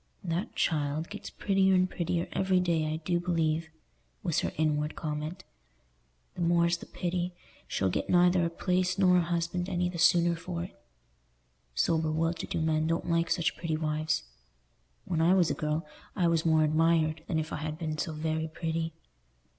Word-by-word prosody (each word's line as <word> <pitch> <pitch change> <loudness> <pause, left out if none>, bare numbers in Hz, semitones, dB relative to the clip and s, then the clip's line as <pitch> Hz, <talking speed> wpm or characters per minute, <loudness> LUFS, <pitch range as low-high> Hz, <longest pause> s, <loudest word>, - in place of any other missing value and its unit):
"That 175 +3 -3
child 150 0 0
gets 210 - -7
prettier 195 -1 +2
and 185 0 +4
prettier 175 -1 -2
every 190 -1 +2
day, 165 -4 +1
I - - -1
do 175 0 +1
believe," 165 -2 0 0.5
was 170 -5 +1
her - - -1
inward 150 -1 0
comment. 155 +4 -4 0.9
"The - - -6
more's 170 0 +3
the - - -11
pity. 175 0 -2 0.3
She'll 95 -1 0
get - - -2
neither 180 0 +4
a 170 - +1
place 180 +1 0
nor 180 -2 +5
a - - +4
husband 175 +1 -1
any 180 -1 0
the 175 -1 -6
sooner 170 0 +4
for 170 0 -5
it. 175 -9 -11 0.9
Sober 160 - +1
well 165 +2 +1
to - - -6
do - - -2
men 160 0 +1
don't 165 +1 -1
like 165 0 +2
such 170 -2 +1
pretty 160 -3 -2
wives. 155 - -1 0.8
When 165 -2 0
I 175 +3 +5
was 175 -5 +3
a - - +1
girl, 155 +1 -2 0.3
I 180 -4 +2
was 165 -1 +2
more 160 -1 +4
admired 155 0 +2
than 165 - 0
if 155 0 -2
I - - -2
had 155 0 -4
been 155 -2 -3
so 165 - -1
very 160 +1 -2
pretty. 160 0 -3
165 Hz, 180 wpm, -29 LUFS, 155-175 Hz, 0.9 s, nor